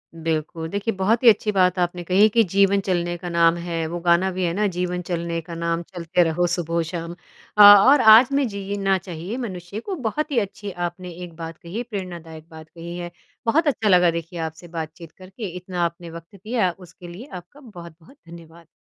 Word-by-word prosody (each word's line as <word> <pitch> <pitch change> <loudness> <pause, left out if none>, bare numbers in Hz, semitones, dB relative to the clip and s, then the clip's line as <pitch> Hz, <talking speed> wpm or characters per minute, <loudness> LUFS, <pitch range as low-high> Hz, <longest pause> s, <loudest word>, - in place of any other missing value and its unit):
बिल्कुल। 160 0 -3
देखिए 205 +4 -2
बहुत 215 +6 +1
ही 235 - +9
अच्छी 210 0 +2
बात 185 -2 +2
आपने 175 0 -1
कही 185 +3 +2
है 215 - +7
कि 230 +2 +3
जीवन 200 0 +4
चलने 175 -1 -1
का 175 0 -7
नाम 170 0 +3
है 165 -1 -2
वो 175 +1 -5
गाना 175 +3 +3
भी 185 0 -3
है 170 - -1
ना 210 +3 0
जीवन 180 -1 -3
चलने 170 -1 -3
का 170 +1 -9
नाम 170 0 -2
चलते 175 0 +1
रहो 170 +2 0
सुबहो 170 -1 -1
शाम। 170 0 -6 0.4
अ, - - +7
और 205 +8 +8
आज 220 +3 +8
में 275 -2 +1
जीना 200 -1 -1
चाहिए 180 +5 -7
मनुष्य 190 -4 -6
को 380 - -5
बहुत 295 +3 -3
ही 255 - +2
अच्छी 200 -1 -5
आपने 175 +1 -5
एक 170 -2 -10
बात 165 -1 -8
कही 200 +8 -6
प्रेरणादायक 170 -7 -8
बात 160 -1 -13
कही 170 +1 -9
है। 175 -1 -6 0.3
बहुत 310 +8 +2
अच्छा 225 -6 +1
लगा 180 -2 +5
देखिए 170 +1 -6
आपसे 160 +2 -6
बातचीत 165 0 -7
करके। 190 +4 -9
इतना 180 0 -5
आपने 170 0 -6
वक़्त 165 +3 -12
दिया 210 -1 -1
उसके 180 -1 -13
लिए 185 +10 -10
आपका 180 - -11
बहुत-बहुत 175 - -14
धन्यवाद! 170 0 -14
175 Hz, 200 wpm, -22 LUFS, 170-200 Hz, 0.4 s, ही